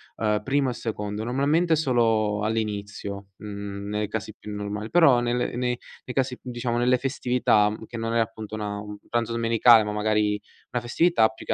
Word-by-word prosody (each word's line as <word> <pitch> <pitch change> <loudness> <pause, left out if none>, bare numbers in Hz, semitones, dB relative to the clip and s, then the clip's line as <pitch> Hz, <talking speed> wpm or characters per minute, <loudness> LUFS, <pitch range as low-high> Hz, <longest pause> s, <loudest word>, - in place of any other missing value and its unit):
uhm, 105 -1 0
primo 135 -1 +1
e - - -4
secondo. 105 -2 -4
Normalmente 150 +7 +2
solo 115 -7 +2
all'inizio, 100 -2 -3
mhmm, 100 -1 -6
nei 105 0 -1
casi 110 0 -5
più 105 - -9
normal 105 +1 -4
però 165 -8 +6
nelle 120 0 0
nei 125 0 0 0.3
nei 125 - -6
casi 130 -2 0
più 125 - -9
diciamo 120 -1 -2
nelle 125 +1 +3
festività 125 -5 +2
che 115 - -8
non 115 0 -2
è - - +3
appunto 110 -1 -3
una 105 -1 -4
un 105 0 -8
pranzo 120 -1 0
domenicale, 115 0 +5
ma 105 - -3
magari 105 -1 +1 0.3
una 120 - -1
festività 120 0 +3
più 110 - -12
che - - 0
115 Hz, 180 wpm, -25 LUFS, 105-125 Hz, 0.3 s, però